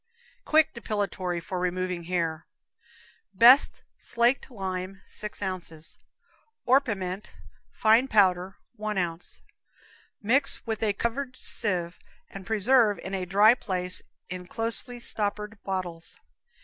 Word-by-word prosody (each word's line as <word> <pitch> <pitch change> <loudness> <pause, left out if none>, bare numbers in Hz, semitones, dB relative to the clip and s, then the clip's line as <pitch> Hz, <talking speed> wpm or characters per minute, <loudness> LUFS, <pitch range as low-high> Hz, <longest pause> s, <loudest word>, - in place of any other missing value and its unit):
Quick 310 0 +3
Depilatory 200 -6 -3
for 180 +2 -5
Removing 180 -1 -2
Hair. 170 -2 -2 0.9
Best 245 +7 +6 0.2
slaked 240 +3 0
lime, 190 -3 -5
6 210 0 -7
ounces; 170 -4 -6 0.7
orpiment, 210 -8 0 0.4
fine 225 +4 +3
powder, 190 -4 +2 0.2
1 215 -1 -3
ounce. 175 -1 -4 0.8
Mix 265 +6 +2
with 220 -2 -3
a 215 -2 +1
covered 255 +5 -3
sieve 180 -8 +1 0.3
and 195 -1 -10
preserve 220 0 +3
in 190 - -8
a 185 -2 -3
dry 205 +5 +6
place 180 -6 -1 0.3
in 180 0 -7
closely 230 +3 -1
stoppered 210 -1 -3
bottles. 180 -4 -5
200 Hz, 110 wpm, -26 LUFS, 180-225 Hz, 0.9 s, Best